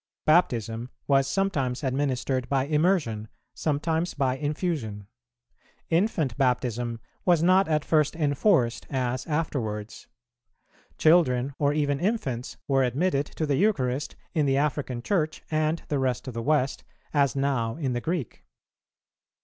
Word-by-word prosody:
Baptism 120 - +2 0.2
was 135 -1 +3
sometimes 140 -6 -1
administered 130 -1 -1
by 135 -1 +1
immersion, 150 - +1 0.3
sometimes 160 +3 -1
by 130 -3 +1
infusion. 145 - -3 0.9
Infant 165 - +1
Baptism 120 -3 0 0.2
was 175 -3 +3
not 185 +2 +5
at 155 -2 0
first 155 -1 +2
enforced 145 - +2
as 130 -1 -2
afterwards. 115 -9 -3 0.9
Children 140 -5 +3
or 145 -1 +3
even 145 -2 0
infants 145 - -2
were 135 -1 +3
admitted 140 +3 +1
to 160 - -3
the 145 -2 +1
Eucharist 145 -9 0 0.2
in 155 -4 +2
the 135 0 +2
African 140 -4 -1
Church 160 -4 -1
and 155 +1 0
the 145 - 0
rest 130 0 -1
of 130 - -5
the 115 - -3
West, 140 0 +1 0.3
as 140 -3 +2
now 135 -5 0
in 140 -5 -2
the 120 - -2
Greek. 160 -6 -3
140 Hz, 130 wpm, -26 LUFS, 125-155 Hz, 0.9 s, not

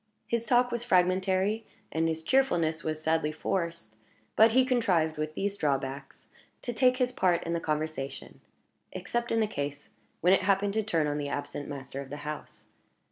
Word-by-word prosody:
His 235 -1 -1
talk 245 +1 +4
was 240 0 -2
fragmentary, 190 +1 +2 0.3
and 160 +1 +1
his 160 0 -2
cheerfulness 165 -10 +2
was 155 -1 -2
sadly 160 -1 +1
forced; 170 - -3 0.4
but 220 +1 +6
he 260 +1 +5
contrived, 185 - +1
with 155 0 -3
these 200 0 -1
drawbacks, 135 -2 -3 0.4
to 240 - -3
take 255 +2 +3
his 250 -1 +1
part 180 -7 +2
in 170 - -2
the 170 - 0
conversation 155 -3 -4 0.5
except 240 0 -3
in 225 - +2
the - - +3
case 145 -7 -5 0.3
when 180 +3 +5
it 195 - +4
happened 200 +1 +2
to 220 - +1
turn 170 -8 0
on 145 0 -1
the 145 -1 -3
absent 145 0 -4
master 135 -1 -6
of 135 - -9
the 145 - -6
house. 150 0 -7
170 Hz, 180 wpm, -29 LUFS, 150-220 Hz, 0.5 s, but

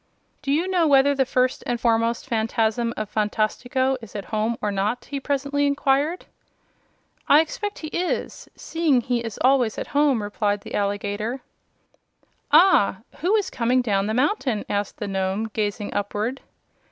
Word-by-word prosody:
"Do 275 - -2
you 325 +6 +1
know 360 -4 +2
whether 280 0 +5
the 265 -2 +1
First 255 0 +1
and 240 -1 -1
Foremost 230 0 +1
Phanfasm 225 +1 0
of 215 - -3
Phantastico 245 +5 0
is 225 -2 -12
at 200 - -5
home 220 +2 0
or 210 - -1
not?" 205 +5 -1
he 280 0 -4
presently 285 +1 0
inquired. 280 +4 +1 1.0
"I 290 - +8
expect 410 +6 -2
he 310 - -6
is, 355 +3 -3
seeing 320 -6 +1
he 240 0 -1
is 225 -3 -6
always 255 -4 +3
at - - -3
home," 285 -6 +3
replied 205 0 -1
the - - -10
alligator. 205 +4 -2 1.1
"Ah; 200 - +5 0.2
who 365 +7 +2
is 415 -3 0
that - - -16
coming 250 +1 +2
down 200 -3 0
the 220 - -1
mountain?" 260 - 0
asked 205 0 -2
the 210 - -4
Nome, 195 +3 -2
gazing 205 -1 -2
upward. 210 +6 -2
240 Hz, 160 wpm, -23 LUFS, 210-280 Hz, 1.1 s, I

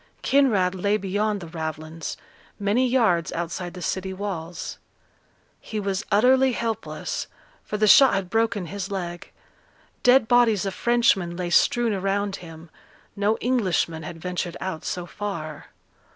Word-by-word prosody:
Kinraid 215 -10 +3
lay 200 +3 +1
beyond 205 +1 -1
the 170 - -7
ravelins, 160 0 -5 0.4
many 210 +6 +2
yards 225 -10 +2
outside 175 +1 -4
the 180 - -7
city 190 +2 -2
walls. 180 -4 -5 0.8
He 215 - -5
was 200 +1 -2
utterly 255 +5 +4
helpless, 230 -1 -3 0.4
for 210 - -4
the 215 - +3
shot 265 +6 +7
had 195 -2 -1
broken 225 -1 0
his 195 +3 -5
leg. 175 -3 -5 0.7
Dead 250 -2 +5
bodies 230 -5 +4
of 195 - -2
Frenchmen 200 -8 +2
lay 175 -1 -3
strewn 235 +4 +3
around 195 +1 -1
him; 165 -1 -12 0.4
no 205 +2 +1
Englishman 190 -9 0
had 165 +1 -8
ventured 180 0 -3
out 185 -4 -4
so 180 -1 -3
far. 170 -6 -6
195 Hz, 135 wpm, -24 LUFS, 175-220 Hz, 0.8 s, shot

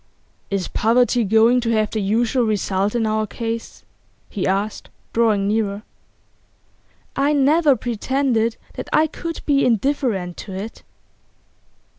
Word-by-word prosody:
'Is 195 -2 -1
poverty 240 +1 +2
going 225 +4 +4
to 230 - -2
have 215 -1 +1
the 215 - -1
usual 230 +5 +1
result 205 -1 0
in 230 -2 +1
our 215 0 0
case?' 230 +1 -5 0.5
he 200 - -2
asked, 200 +3 -2 0.2
drawing 215 -4 +2
nearer. 210 -1 -1 1.3
'I 285 +2 +2
never 290 +1 +4
pretended 240 -1 0 0.2
that - - -7
I 310 - +4
could 330 +1 -6
be 280 -2 +3
indifferent 230 -7 0
to 195 - -8
it. 200 +4 -7
225 Hz, 125 wpm, -21 LUFS, 210-250 Hz, 1.3 s, going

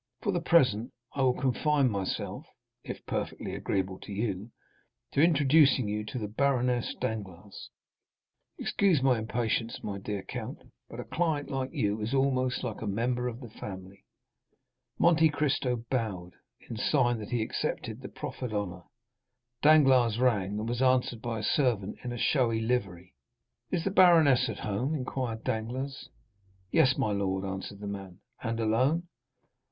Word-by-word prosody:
For 205 - +1
the 175 -3 -1
present, 125 -9 +3 0.2
I 140 - -2
will 130 -1 +3
confine 135 0 +2
myself 100 -2 -3 0.4
(if - - -7
perfectly - - -3
agreeable 95 -1 -2
to - - -10
you) 100 0 -2 0.6
to 140 - +2
introducing 145 -5 +5
you 105 +1 -2
to 110 - -5
the 110 -3 -3
Baroness 125 +1 +1
Danglars—excuse 105 - -4
my 130 -3 +4
impatience, 115 +1 -2
my 100 -1 -4
dear 100 0 -4
count, - - -6 0.3
but - - -9
a - - -3
client 160 -4 -1
like 135 -1 -2
you 110 -7 -1
is 115 +6 -1
almost 130 -2 +1
like - - -4
a 110 - -3
member 120 +4 0
of 120 +1 -5
the 120 - -9
family." 95 -1 -9 0.9
Monte 160 -2 +5
Cristo 135 -5 0
bowed, 100 -8 -2 0.3
in 115 - -6
sign 120 0 +2
that 105 - -7
he 120 -3 0
accepted 115 -2 -3
the 130 - -7
proffered 125 -4 -6
honor; 90 -4 -3 0.8
Danglars 135 -7 +5
rang 105 -6 +1
and 110 +1 -3
was 120 +1 -2
answered 130 -3 +2
by 115 -2 -3
a - - -8
servant 110 -7 +1
in 125 - -4
a 120 - -4
showy 115 -3 +2
livery. 100 -7 -2 0.6
"Is 175 -3 -1
the 195 - -1
baroness 160 - +6
at 110 - -4
home?" 120 +9 -1
inquired 125 -4 -3
Danglars. 130 +5 -3 0.6
"Yes, 130 -1 +4
my 130 -6 +1
lord," 95 -1 -1
answered 95 +1 -6
the - - -5
man. 95 -3 -7 0.2
"And 115 -1 -2
alone?" 130 +10 +2
120 Hz, 150 wpm, -29 LUFS, 105-135 Hz, 0.9 s, baroness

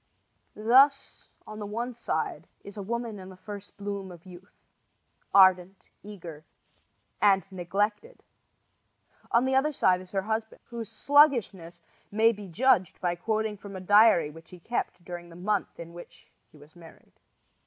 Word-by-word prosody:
Thus 265 +6 +3 0.2
on 215 0 -9
the 210 - -5
one 235 +4 -4
side 235 - -3 0.2
is 200 - -11
a 205 - -6
woman 230 0 -4
in 185 0 -10
the 185 - -13
first 200 +1 -10
bloom 200 -2 -5
of 175 0 -14
youth, 185 +2 -14 0.8
ardent, 185 -1 +4 0.2
eager 175 -7 -10 0.8
and 195 -4 +4
neglected. 205 - -3 1.1
On 235 +2 +3
the 265 - 0
other 270 +3 +2
side 185 -10 +2
is 185 - -13
her 195 0 -2
husband, 220 +1 -4
whose 230 -3 -7
sluggishness 230 - +2 0.3
may 220 +2 +3
be 205 -3 -9
judged 190 0 +2
by 175 -1 0
quoting 215 +3 -2
from 200 0 -10
a - - -5
diary 205 -5 +5
which 160 +1 -15
he 180 - -12
kept 180 -3 -4
during 175 -1 -8
the 170 - -14
month 200 +3 -2
in 170 0 -9
which 175 0 -13 0.2
he - - -18
was 150 +3 -18
married. 165 -2 -17
200 Hz, 155 wpm, -27 LUFS, 180-225 Hz, 1.1 s, diary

